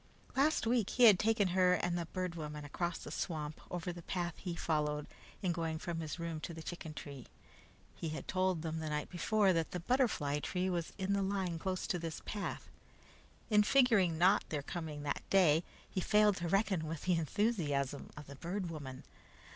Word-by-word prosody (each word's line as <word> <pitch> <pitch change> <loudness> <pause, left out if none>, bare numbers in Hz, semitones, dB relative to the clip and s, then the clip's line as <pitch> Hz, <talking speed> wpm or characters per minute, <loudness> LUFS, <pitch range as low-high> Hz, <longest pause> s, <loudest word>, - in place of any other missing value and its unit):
Last 290 +1 +3
week 230 -3 +2
he 250 - +2
had 210 -6 +9
taken 215 -3 +3
her 180 0 +4
and 175 -1 0
the 170 -2 -2
Bird 185 0 -3
Woman 150 -2 -6
across 170 +4 -2
the - - -8
swamp 155 -3 -3
over 175 0 -3
the 175 - -9
path 175 0 -2
he 175 -3 -4
followed 150 -3 0 0.4
in 180 - +2
going 165 -2 -2
from 170 0 -4
his 160 0 -4
room 170 -2 -3
to 170 +1 -6
the 160 - -8
chicken 160 -3 -6
tree. 140 -5 -8 0.7
He 165 - -4
had 155 - -6
told 185 -3 +1
them 160 -1 -2
the 160 -1 -3
night 150 0 -2
before, 195 +2 +3
that 165 -2 0
the 180 - -4
butterfly 170 - +1
tree 185 +4 -1
was 170 -2 -2
on 190 +1 0
the 200 - +2
line 190 -4 -1
close 185 +1 -2
to 180 - -1
this 165 -2 -4
path. 205 -2 -4 0.8
In 210 0 +7
figuring 215 -7 +4
on 190 +4 +6
their 150 -2 -1
not - - -19
coming 160 -4 -5
that 145 - -2
day, 175 -4 +5 0.2
he 185 - -2
failed 210 0 +4
to 170 - -2
reckon 190 -3 +1
with 160 -1 -5
the 185 - +2
enthusiasm 155 - 0
of 150 - -8
the 140 - -10
Bird 175 +4 -3
Woman. 135 -5 -7
175 Hz, 200 wpm, -35 LUFS, 155-190 Hz, 0.8 s, had